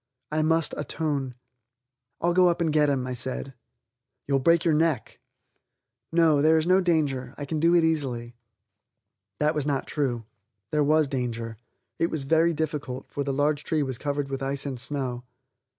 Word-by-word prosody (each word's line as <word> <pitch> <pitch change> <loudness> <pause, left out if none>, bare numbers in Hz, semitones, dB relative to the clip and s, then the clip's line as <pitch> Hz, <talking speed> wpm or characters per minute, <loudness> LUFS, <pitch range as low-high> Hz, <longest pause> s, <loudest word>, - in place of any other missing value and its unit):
I 155 +1 +1
must 160 0 +1
atone. 145 -4 -2 0.9
"I'll 175 +1 +2
go 180 0 +5
up 170 - 0
and 165 -3 +1
get 150 -1 +4
him," 135 -3 0
I 130 - -3
said. 130 +2 -3 0.7
"You'll 140 -1 +2
break 165 +5 +3
your 165 - +4
neck." 150 -6 0 0.9
"No, 165 -3 +4
there 160 +2 +5
is 160 - +1
no 185 +2 +4
danger. 145 -8 0
I 145 - -5
can 155 +2 -2
do 170 +2 +4
it 170 - +5
easily." 130 -7 -1 1.0
That 150 +1 +2
was 150 -1 -2
not 140 -2 0
true. 125 -6 -2 0.5
There 150 -1 +2
was 155 +1 +3
danger. 115 -4 -3 0.4
It 165 - +3
was 155 -3 -3
very 160 +4 +3
difficult, 145 -5 -4
for 140 - -2
the 140 - -2
large 145 +2 +1
tree 155 -2 0
was 130 -3 -4
covered 145 -1 -2
with 135 0 -3
ice 135 +1 -2
and 135 -3 -4
snow. 125 -2 -3
145 Hz, 175 wpm, -26 LUFS, 135-160 Hz, 1.0 s, go